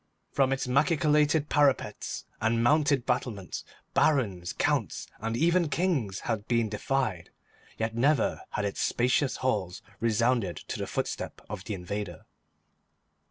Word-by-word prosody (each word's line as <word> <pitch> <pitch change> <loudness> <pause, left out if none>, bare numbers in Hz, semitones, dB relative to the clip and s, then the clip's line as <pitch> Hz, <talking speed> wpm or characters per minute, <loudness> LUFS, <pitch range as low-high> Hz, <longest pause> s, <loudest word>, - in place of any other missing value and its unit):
From 135 -1 +2
its 135 - 0
machicolated 150 +2 +3
parapets 145 -3 +1 0.2
and 115 +1 +2
mounted 145 0 +3
battlements 120 -7 -2 0.3
Barons, 100 - +2
Counts, - - 0
and 115 +2 -2
even 170 +3 +3
Kings 145 - 0
had 110 -3 -3
been 115 -2 +2
defied, 110 -4 -1 0.5
yet 110 0 -1
never 130 +2 +2
had 105 - -2
its 100 - -2
spacious 125 +3 +2
halls 100 -8 -1 0.2
resounded 115 -4 +1
to - - -6
the - - -3
footstep - - -3
of 100 -2 -7
the 105 - -3
invader. 90 -1 -5
120 Hz, 125 wpm, -28 LUFS, 105-140 Hz, 0.5 s, machicolated